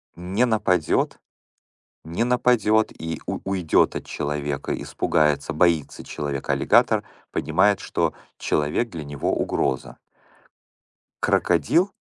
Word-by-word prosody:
Не 95 +8 0
нападет. 95 -8 +1 0.8
Не 85 +8 -2
нападет 120 -3 +3
и 80 0 -4
у - - -3
уйдет 95 -4 +2
от - - -5
человека. 75 -1 -3
Испугается, 75 0 0
боится 80 -1 +1
человека 70 -2 -4
аллигатор, - - +3 0.3
понимает, - - +2
что - - -1 0.2
человек 75 +11 0
для 80 -6 -7
него 70 -1 -2
угроза. 65 - -1 1.2
Крокодил 90 - +2
80 Hz, 100 wpm, -23 LUFS, 75-105 Hz, 1.2 s, нападет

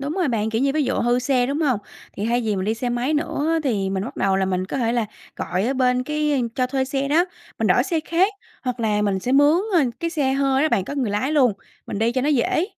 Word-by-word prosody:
Đúng 280 +2 -3
rồi 360 -4 0
bạn, 220 -2 0
kiểu 225 +2 0
như, 275 0 +2
ví 310 - +2
dụ - - 0
hư 240 +1 +2
xe, 250 -1 +1
đúng 280 +4 -2
hông? 260 -9 +2 0.3
Thì 200 - -4
hay 240 +2 +1
vì 215 -4 -1
mình 185 - -2
đi 220 - 0
xe 245 +2 -3
máy 245 +5 0
nữa 295 -1 -1
á 330 - +2
thì 200 -7 0
mình 190 0 -2
bắt 245 - -8
đầu 195 -1 +1
là 190 - +1
mình 185 -1 -1
có - - -4
thể 230 -1 +1
là 235 -3 0 0.3
gọi 185 +4 -2
ở 265 - 0
bên 250 -1 +2
cái 300 -1 0
cho 255 - +1
thuê 265 +1 -1
xe 270 +1 -2
đó, 320 +5 +4 0.3
mình - - +1
đổi - - +4
xe 335 -4 0
khác, 345 +6 +1 0.3
hoặc 250 -2 -3
là 210 -2 +1
mình 200 -2 +1
sẽ 250 +7 -2
mướn, 290 +3 +5 0.2
ơ, 340 - +6 0.2
cái 335 -1 -1
xe 290 -5 0
hơi 275 0 +2
đó 310 - +3
bạn, 195 - +1
có 280 - -5
người 260 -7 -1
lái 215 +8 -1
luôn, 265 -7 +4 0.3
mình - - -4
đi 225 +2 +1
cho 255 - 0
nó 280 - 0
dễ. 300 +5 +2
255 Hz, 285 wpm, -22 LUFS, 220-290 Hz, 0.3 s, ơ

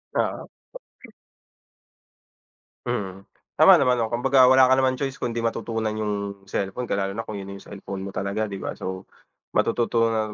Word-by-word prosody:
Oo. - - -1 2.4
Mm, 100 -6 -3 0.4
tama - - +9
naman, 125 -1 +3
'no. 110 - -1
Kumbaga 130 +2 +4
wala 130 0 +7
ka 130 - +4
naman 130 -1 +2
choice 135 0 -4
kundi 120 -1 -2
matutunan 115 -1 -2
yung 100 -2 -3
cellphone, 100 +5 -3
ka - - 0
lalo 100 0 -1
na 115 - -3
kung 110 -2 -7
yun 95 - -6
na 100 - -8
yung - - -14
cellphone 100 -1 -7
mo 100 - -5
talaga, 100 +2 -2
di 100 - -5
ba? - - -4
So, 95 0 -6 0.5
matututunan 115 -2 +1
110 Hz, 165 wpm, -24 LUFS, 100-125 Hz, 2.4 s, tama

